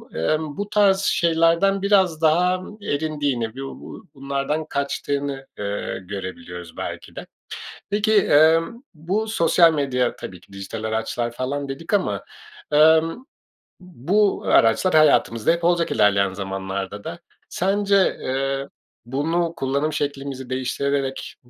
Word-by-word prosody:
ımm, 150 - -1
bu 205 0 -4
tarz 200 -2 +4
şeylerden 170 +3 +2
biraz 190 -5 +2
daha 180 +3 +3 0.2
erindiğini, 145 - -2
b-bu 135 0 -9
bunlardan 140 +3 -3
kaçtığını, 140 -1 -3
ııı, 100 0 -3
görebiliyoruz 90 -3 -8
belki - - -7
de. - - -7 0.6
Peki, 210 +2 +1
emm, 165 - +3
bu 185 +8 -2
sosyal 170 -5 +4
medya 125 -4 0
tabii 90 - -9
ki 95 - -21
dijital 100 +3 -7
araçlar 110 +2 -2
falan 140 +3 -4
dedik 165 +8 -6
ama, 200 - 0 0.5
emm, 160 - +4 0.6
bu 180 - 0
araçlar 115 +11 +3
hayatımızda 145 -6 +4
hep 170 0 -1
olacak 170 -1 +2
ilerleyen 100 -2 +3
zamanlarda 95 +1 -5
da. - - -7 0.3
Sence, 200 +1 +1
eee, 135 +1 -2 0.4
bunu 165 +6 -1
kullanım 140 +3 -1
şeklimizi 140 -3 -4
değiştirerek 135 +1 -2
145 Hz, 115 wpm, -22 LUFS, 125-170 Hz, 0.6 s, tarz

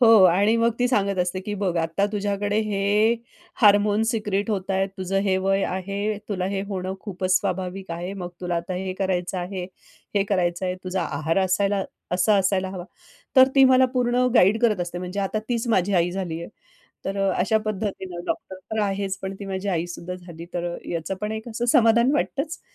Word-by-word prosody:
हो 225 -4 +8
आणि 200 +6 +4
मग 230 0 +3
ती 245 - +3
सांगत 200 -5 +1
असते, 180 +1 0
की 205 +2 -4
बघ 190 -3 -1
आता 165 +5 +1
तुझ्याकडे 205 0 -1
हे 210 +2 +2 0.5
हार्मोन्स 210 +2 +5
सिक्रेट 210 -2 -1
होत 195 -2 -2
आहेत, 195 0 +1
तुझं 190 +1 -1
हे 190 -2 +2
वय 195 +1 +1
आहे, 200 +3 -2
तुला 185 -3 -1
हे 195 -1 -2
होणं 190 -1 -3
खूपच 185 -2 0
स्वाभाविक 185 0 -3
आहे. 175 +3 -4
मग 180 -3 -5
तुला 175 -1 -1
आता 170 +2 -3
हे 185 +1 -3
करायचं 185 -1 -1
आहे, 180 +1 -4 0.5
हे 200 - +3
करायचं 180 -2 0
आहे, 180 - -1
तुझा 185 0 -1
आहार 155 +4 -1
असायला 195 +1 +1 0.3
असा 200 +3 +3
असायला 190 0 +1
हवा. 180 -2 -6 0.5
तर 260 0 +8
ती 270 -1 +7
मला 260 0 +6
पूर्ण 250 0 +2
गाईड 210 +2 +5
करत 215 -5 +3
असते. 175 0 -3
म्हणजे 185 +2 -4
आता 195 +2 -1
तीच 235 0 -1
माझी 190 +2 +1
आई 175 0 +3
झाली 175 -3 -4
आहे. - - -7 0.6
तर 195 +1 -2
अ, 195 -1 +2
अशा 210 +4 +3
पद्धतीनं 190 -4 -4
डॉक्टर 190 - -4 0.2
तर 220 - 0
आहेच 195 -1 -1
पण 190 0 -4
ती 200 - -6
माझी 190 +1 -4
आई 175 -1 -1
सुद्धा 180 +1 -6
झाली. 170 -2 -10
तर 175 0 -2
अ, - - -6
याचं 170 +2 -3
पण 210 +1 -2
एक 220 - -14
असं 235 +2 -2
समाधान 235 +2 +5
वाटतंच. 295 +2 -1
195 Hz, 200 wpm, -24 LUFS, 180-210 Hz, 0.6 s, हो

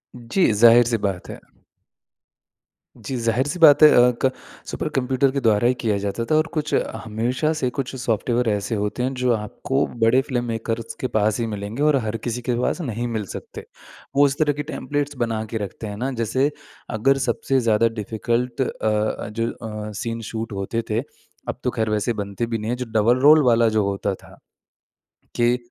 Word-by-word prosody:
जी, 120 +7 +1
ज़ाहिर-सी 115 +2 +6
बात 95 -2 -5
है। - - -7 1.6
जी 135 - -6
ज़ाहिर-सी 130 +9 0
बात 155 -2 +7
है 155 - +11
अ, 125 0 +6
क 130 - +3 0.4
सुपर - - -3
कंप्यूटर 130 +1 +2
के 140 - -1
द्वारा 110 -2 +3
ही 125 - +3
किया 110 -3 +1
जाता 100 +4 -3
था 155 - +1
और 155 +1 +3
कुछ 150 -2 -2 0.3
हमेशा 120 +7 -1
से 130 - 0
कुछ 135 0 -4
सॉफ्टवेयर 120 0 0
ऐसे 105 +3 -1
होते 105 +4 -2
हैं 130 +1 -1
जो 125 -1 0
आपको 110 +6 -2 0.2
बड़े 120 +4 +5
फ़िल्म 130 -3 -2
मेकर्स 115 0 -4
के 130 - -1
पास 105 +2 +1
ही 115 - 0
मिलेंगे 105 +5 -4
और 150 -1 +4
हर 110 +1 -2
किसी 120 +2 -4
के 120 0 -1
पास 175 - -1
नहीं 120 -4 -3
मिल 110 -3 -3
सकते। - - -9 0.5
वो 145 +1 +6
इस 140 +1 -3
तरह 150 -2 +3
के 145 +1 -4
टेम्पलेट्स 145 -1 -3
बनाकर 110 -1 -3
रखते 105 +2 -7
हैं 105 0 -6
ना 130 +5 -2
जैसे 130 +6 +1 0.4
अगर 130 +5 +2
सबसे 130 +3 +1
ज़्यादा 115 -1 +3
डिफिकल्ट 115 +4 -2
अ - - +2
अ, 105 -1 -1
जो 115 +2 -2
अ, 105 -2 -7
सीन 115 +2 -4
शूट 110 0 -4
होते 100 +4 -2
थे। 110 +1 +1 0.5
अब - - -4
तो - - +1
ख़ैर 110 -1 -1
वैसे 105 +3 0
बनते 100 +1 -3
भी 115 -1 -2
नहीं 110 +1 -4
है - - 0
जो 125 - -4
डबल 110 +3 +3
रोल 150 +2 +7
वाला 120 -2 +4
जो 110 -1 +1
होता 100 0 -1
था - - -17 1.0
कि 120 +1 +3
115 Hz, 190 wpm, -22 LUFS, 110-130 Hz, 1.6 s, है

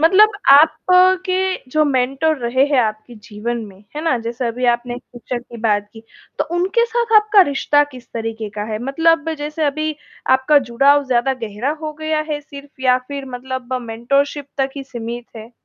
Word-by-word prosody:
मतलब 400 +7 +6 0.2
आप 295 +3 +7 0.5
के 370 0 +1 0.3
जो 310 +3 +3
मेंटर 275 +3 +1
रहे 255 +2 +2
हैं 285 -2 +1
आपके 215 +1 -3
जीवन 215 +2 -5
में, 190 -2 -15 0.2
है 305 - -3
ना? 325 -6 +2
जैसे 235 +2 -4
अभी 245 +2 -3
आपने 240 0 -4
टीचर 245 0 -7
की 240 0 -12
बात 205 -2 +1
की, 225 - -13 0.4
तो - - +1
उनके 385 +7 +2
साथ 470 0 -1
आपका 425 -1 +5
रिश्ता 290 +1 +2
किस 250 -1 -12
तरीक़े 225 -1 -4
का 210 - -3
है, 215 - -2
मतलब 325 +5 +2
जैसे 300 +2 -3
अभी 310 +2 -1 0.4
आपका 260 +3 +5
जुड़ाव 280 +4 +4
ज़्यादा 255 +1 +1
गहरा 225 +5 -2
हो 310 -1 -4
गया 310 0 0
है 295 -1 -2
सिर्फ़? 285 -1 -13
या 255 -1 +4
फिर 280 -1 -5
मतलब 260 0 -6
मेंटोरशिप 275 +5 -1
तक 270 0 +1
ही 275 - -4
सीमित 240 -2 -6
है? 220 +1 -10
265 Hz, 180 wpm, -19 LUFS, 235-300 Hz, 0.5 s, आप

